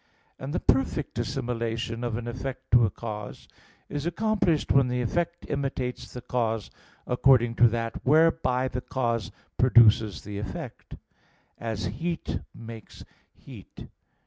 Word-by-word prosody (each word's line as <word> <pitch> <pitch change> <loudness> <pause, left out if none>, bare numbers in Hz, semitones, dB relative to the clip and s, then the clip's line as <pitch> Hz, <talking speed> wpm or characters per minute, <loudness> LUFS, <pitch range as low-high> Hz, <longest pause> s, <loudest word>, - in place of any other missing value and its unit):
And 135 +2 -5
the 170 - 0
perfect 135 -1 0
assimilation 115 -2 -2
of 120 -2 -1
an 120 0 -5
effect 130 +2 -6
to 120 -1 +7
a - - -2
cause 105 0 -7 0.4
is 145 -1 -4
accomplished 180 -4 +1
when 135 -2 +5
the 125 0 -1
effect 170 +8 -1
imitates 135 -3 -3
the 125 - -7
cause 115 -4 -1 0.3
according 125 -2 +4
to 120 - +7
that 115 0 -3
whereby 145 -3 +3
the 125 0 -4
cause 120 -4 -1 0.3
produces 115 -4 +5
the 100 0 -6
effect; 95 -3 -7 0.6
as 115 -5 -3
heat 160 - -3 0.2
makes 115 -2 -10 0.3
heat. - - -12
125 Hz, 130 wpm, -27 LUFS, 115-135 Hz, 0.6 s, to